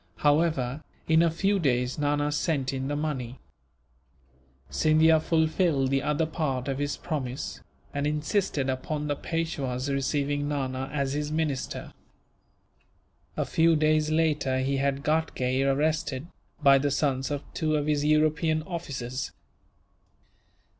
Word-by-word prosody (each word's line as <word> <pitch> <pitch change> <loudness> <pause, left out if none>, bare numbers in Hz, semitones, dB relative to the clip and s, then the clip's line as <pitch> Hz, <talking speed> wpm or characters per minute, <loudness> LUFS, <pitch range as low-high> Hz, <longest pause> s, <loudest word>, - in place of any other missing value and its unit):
However, 145 -2 +1 0.2
in 160 0 +5
a 170 - +4
few 195 +5 +1
days 125 -4 0
Nana 145 0 +1
sent 145 -3 0
in 135 0 -2
the 145 - -1
money. 135 -5 -3 1.3
Scindia 155 - +4
fulfilled 160 -4 +1
the 135 0 +2
other 150 +3 +1
part 140 -5 -2
of 135 0 -2
his 145 0 -1
promise, 135 -6 -4 0.3
and 145 0 -1
insisted 150 -1 0
upon 145 +3 -2
the 145 -1 -1
Peishwa's 140 -5 -2
receiving 145 +1 0
Nana 135 -2 -2
as 140 -2 -1
his 150 0 -2
minister. 155 -4 -2 1.4
A - - 0
few 165 0 +3
days 155 0 +2
later 150 -4 +1
he 135 +1 0
had 140 0 0
Ghatgay 140 -5 0
arrested, 145 0 0 0.4
by 140 -1 +7
the 145 +1 +1
sons 135 -2 0
of 145 -1 -3
two 155 -1 0
of 145 -1 0
his 150 -1 +1
European 155 +1 +2
officers. 135 -7 -5
145 Hz, 130 wpm, -27 LUFS, 135-155 Hz, 1.4 s, by